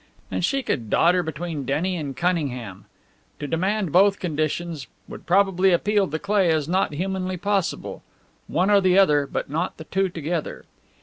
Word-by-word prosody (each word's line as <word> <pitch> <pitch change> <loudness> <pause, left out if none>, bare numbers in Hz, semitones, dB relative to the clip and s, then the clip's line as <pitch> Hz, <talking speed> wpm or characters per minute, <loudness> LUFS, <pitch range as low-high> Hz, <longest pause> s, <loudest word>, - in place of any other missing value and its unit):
And - - -2
she 275 -1 0
could 115 - -2
dodder 180 - +3
between 160 -2 -5
Denny 155 +8 -1
and 145 -5 -5
Cunningham! 130 - -2 0.5
To 150 - -4
demand 185 +4 -1
both 195 +4 +4
conditions 155 -2 -3 0.2
would - - -11
probably 190 0 +3
appeal 205 +2 +1
to 160 - -2
Cleigh 195 0 +1
as 155 -3 +1
not 180 -3 0
humanly 185 +2 -2
possible. 200 -1 -2 0.5
One 185 +4 +1
or 200 -1 +5
the 185 0 +3
other, 150 -7 +4
but - - -2
not 160 +5 -3
the 160 - -8
two 190 +3 0
together. 165 -1 -4
175 Hz, 165 wpm, -23 LUFS, 155-190 Hz, 0.5 s, or